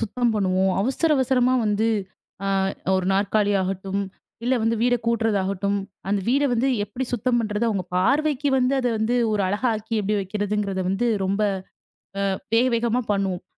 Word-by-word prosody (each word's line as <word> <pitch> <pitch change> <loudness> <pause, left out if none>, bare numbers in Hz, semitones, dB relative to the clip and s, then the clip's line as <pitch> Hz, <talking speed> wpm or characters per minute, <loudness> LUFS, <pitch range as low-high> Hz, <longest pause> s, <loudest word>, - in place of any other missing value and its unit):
சுத்தம் 235 +1 0
பண்ணுவோம், 190 -1 +1
அவசர 265 +9 +1
அவசரமா 255 -1 +2
வந்து, 210 +2 +1 0.6
அ - - 0 0.5
1 185 -1 -1
நாற்காலியாகட்டும், 195 -1 0 0.4
இல்ல 255 +2 +2
வந்து 230 +1 +1
வீட 245 0 +3
கூட்றதாகட்டும், 200 -3 0 0.3
அந்த 200 0 +1
வீட 275 +3 +3
வந்து 245 +3 +1 0.2
எப்டி 245 +6 -4
சுத்தம் 245 +1 +1
பண்ணுறது, 215 0 -1
அவுங்க 195 -4 -1
பார்வைக்கு 285 +7 +2
வந்து, 255 +1 +2
அத 250 - -1
வந்து 220 +3 +1 0.2
ஒரு 210 -1 +1
அழகாக்கி 220 +1 -1
எப்டி 210 +1 0
வைக்கிறதுங்கிறத 200 -1 -2
வந்து, 205 +5 0 0.2
ரொம்ப 195 +2 -1 0.9
அ - - 0 0.2
வேக 235 +2 +4
வேகமா 235 +1 +1
பண்ணுவோம். 195 -3 -2
215 Hz, 145 wpm, -23 LUFS, 195-245 Hz, 0.9 s, வேக